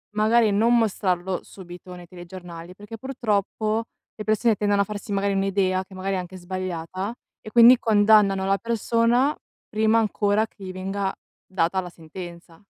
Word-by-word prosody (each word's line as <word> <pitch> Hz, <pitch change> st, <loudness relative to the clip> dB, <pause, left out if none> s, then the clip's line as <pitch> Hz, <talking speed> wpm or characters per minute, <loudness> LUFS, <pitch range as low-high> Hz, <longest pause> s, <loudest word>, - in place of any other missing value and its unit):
magari 220 Hz, +1 st, +3 dB
non 230 Hz, +4 st, +3 dB
mostrarlo 190 Hz, -4 st, 0 dB
subito 180 Hz, -1 st, -11 dB
nei 175 Hz, 0 st, -11 dB
telegiornali 175 Hz, -1 st, -10 dB
perché 205 Hz, +3 st, -10 dB
purtroppo 220 Hz, -3 st, -1 dB, 0.3 s
le 215 Hz, -, -6 dB
persone 215 Hz, +1 st, +2 dB
tendono 205 Hz, 0 st, +1 dB
a -, -, +1 dB
farsi 205 Hz, +1 st, -7 dB
magari 200 Hz, 0 st, 0 dB
un'idea, 195 Hz, -1 st, 0 dB
che 190 Hz, -, -14 dB
magari 190 Hz, +1 st, -2 dB
è -, -, 0 dB
anche 180 Hz, +1 st, -8 dB
sbagliata, 185 Hz, +2 st, -5 dB, 0.3 s
e -, -, -9 dB
quindi 240 Hz, +2 st, +8 dB
condannano 205 Hz, -3 st, +4 dB
la 195 Hz, 0 st, +2 dB
persona 235 Hz, +4 st, +1 dB, 0.3 s
prima 220 Hz, +1 st, +2 dB
ancora 210 Hz, -1 st, +1 dB
che 200 Hz, -, -16 dB
gli 185 Hz, -, -6 dB
venga 190 Hz, +1 st, -3 dB, 0.3 s
data 185 Hz, 0 st, 0 dB
la 180 Hz, -, -8 dB
sentenza. 170 Hz, +2 st, -11 dB
200 Hz, 155 wpm, -24 LUFS, 185-215 Hz, 0.3 s, quindi